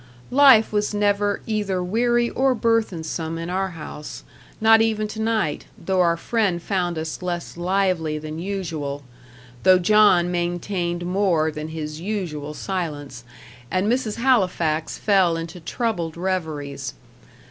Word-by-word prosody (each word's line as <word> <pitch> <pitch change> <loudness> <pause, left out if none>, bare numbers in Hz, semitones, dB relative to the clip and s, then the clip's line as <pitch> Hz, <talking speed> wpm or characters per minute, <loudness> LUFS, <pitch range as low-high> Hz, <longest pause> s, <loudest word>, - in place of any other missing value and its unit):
Life 260 -5 +6
was 210 0 0
never 205 0 +1
either 205 -4 -1
weary 240 +5 +2
or 265 -1 +2
burthensome 175 -8 -1
in 165 +1 -4
our 190 +1 0
house 150 -1 -8 0.4
not 225 0 +6
even 215 -1 +1
to 220 +1 -5
night, 220 -9 0
though 185 +2 0
our 170 -1 +3
friend 200 -3 0
found 175 -2 -1
us 160 +2 -4
less 175 -1 -4
lively 175 -3 0
than 155 +1 -6
usual 165 -7 -4 0.6
though 185 0 +6
John 185 -2 +4
maintained 175 0 -2
more 180 -4 +1
than 150 0 -6
his 155 -1 -6
usual 165 -7 -4
silence, 145 -10 -4 0.5
and 185 +5 0
Mrs. 230 -1 0
Halifax 180 -11 +1
fell 190 -5 +3
into 165 +2 -6
troubled 170 -4 -3
reveries. 160 -6 -3
180 Hz, 130 wpm, -23 LUFS, 165-210 Hz, 0.6 s, Life